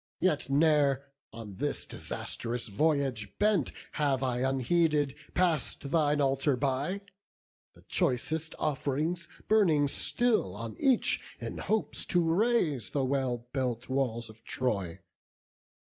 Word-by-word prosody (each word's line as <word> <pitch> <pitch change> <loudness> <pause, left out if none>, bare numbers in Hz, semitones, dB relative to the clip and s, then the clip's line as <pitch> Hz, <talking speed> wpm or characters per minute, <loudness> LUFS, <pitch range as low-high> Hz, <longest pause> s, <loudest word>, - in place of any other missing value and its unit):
Yet 165 -7 +1
ne'er, 140 -2 +3 0.3
on 110 -4 -9
this 145 +2 -1
disastrous 120 0 -4
voyage 135 -5 0
bent, 205 -8 +2 0.2
Have 140 -3 0
I 125 -2 0
unheeded 140 +3 +2 0.2
pass'd 170 -6 +1
thine 150 -3 +3
altar 135 0 +2
by; 140 +8 -1 0.7
The - - -19
choicest 160 +6 -1
off'rings 155 +4 -1 0.2
burning 165 -10 +4
still 220 - +1
on 115 +1 -6
each, 265 -3 +3 0.2
In - - -5
hopes 220 0 -1
to 175 -1 +3
raze 180 - +2
the 140 -2 0
well 130 -3 -1
built 125 -3 -2
walls 125 -4 -1
of 110 0 -15
Troy. 100 -10 -2
140 Hz, 115 wpm, -30 LUFS, 125-160 Hz, 0.7 s, burning